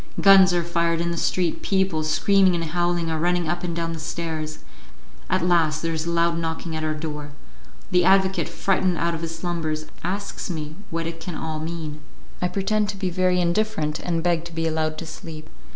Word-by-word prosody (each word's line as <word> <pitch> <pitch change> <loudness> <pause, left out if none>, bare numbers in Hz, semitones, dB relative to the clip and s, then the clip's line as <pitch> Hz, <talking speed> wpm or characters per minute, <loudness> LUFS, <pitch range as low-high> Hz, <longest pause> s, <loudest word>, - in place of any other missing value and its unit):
Guns 195 -1 +8
are 175 -1 +1
fired 170 -1 +1
in 170 0 0
the - - -2
street, 175 0 0
people, 190 -5 +1
screaming 185 +4 +4
and 170 - -1
howling, 175 0 0
are 160 - -1
running 175 0 +1
up 175 +2 -2
and 170 -2 -2
down 165 -1 -2
the 165 - -6
stairs; 155 -1 -4 0.7
at 185 -1 +2
last 160 -3 +2
there 165 0 0
is 160 +1 -2
a - - 0
loud 170 0 +2
knocking 160 0 -3
at 155 - -3
our 155 0 0
door. 150 -2 -5 0.6
The 180 0 +4
advocate, 190 +1 +3
frightened 185 -2 +1
out 170 0 +1
of 165 - -4
his 165 0 -4
slumbers, 165 -3 -2 0.2
asks 195 +4 -3
me 155 -3 -4
what 165 0 -2
it 165 0 -5
can 165 +1 -5
all 155 -1 -3
mean; 160 -2 -5 0.4
I 180 - +2
pretend 205 +3 0
to 205 - -4
be 190 -2 -1
very 180 0 +2
indifferent, 170 -4 0
and 165 -2 -1
beg 170 -2 +2
to 170 - -8
be 165 0 -1
allowed 155 -1 0
to 165 - -5
sleep. 160 -1 -8
170 Hz, 205 wpm, -24 LUFS, 160-180 Hz, 0.7 s, Guns